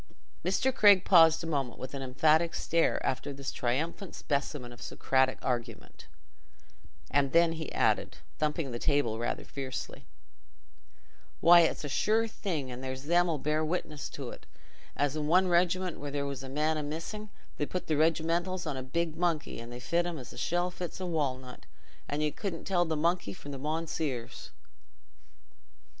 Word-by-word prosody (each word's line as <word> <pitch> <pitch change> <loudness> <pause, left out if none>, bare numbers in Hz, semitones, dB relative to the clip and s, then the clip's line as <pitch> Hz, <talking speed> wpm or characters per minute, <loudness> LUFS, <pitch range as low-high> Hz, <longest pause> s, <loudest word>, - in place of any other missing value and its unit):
'" - - -34
Mr. 195 +9 +1
Craig 205 -6 +6
paused 165 -3 +6
a - - -3
moment 140 -6 -2
with 130 +1 -7
an 140 - -4
emphatic 155 +6 +3
stare 165 0 +1
after 135 +2 -1
this 140 0 -5
triumphant 160 - -2
specimen 140 -3 -2
of 120 - -15
Socratic 130 -1 +1
argument, 120 -3 -4 1.0
and 140 -1 +2
then 170 0 +5 0.2
added, - - +1 0.2
thumping 150 -2 -1
the 120 - -4
table 130 -7 +1
rather 120 - -2
fiercely, 130 -2 -6 1.3
"Why, 175 +1 +8
it's 165 -2 +2
a - - -3
sure 220 +10 +2
thing—and 140 - -4
there's 130 0 -5
them 175 +3 +3
'ull 160 - 0
bear 150 +2 0
witness 155 -2 -3
to't—as 145 0 -6
i' - - -1
one 175 +5 +3
regiment 180 +1 +1
where 145 - -5
there 140 0 -2
was 140 -1 -4
one 135 0 -8
man 155 +1 +1
a - - -1
missing, 165 +8 -5 0.3
they 145 - -1
put 180 - -4
the 155 - 0
regimentals 165 +4 +1
on 150 -3 -2
a 130 - -4
big 160 +5 -2
monkey, 170 -7 -1
and 115 +1 -8
they 120 - -7
fit 170 +7 0
him 170 -2 -4
as 130 -3 -9
the - - -12
shell 175 +1 0
fits 175 -1 -6
the 185 - -4
walnut, 130 -7 -3 0.4
and 145 +1 -1
you 150 - +1
couldn't 175 +1 -5
tell 175 -2 +2
the 160 -1 -1
monkey 170 - 0
from 145 - -9
the 135 - -6
mounseers!" 150 -4 -3
155 Hz, 170 wpm, -30 LUFS, 135-170 Hz, 1.3 s, Why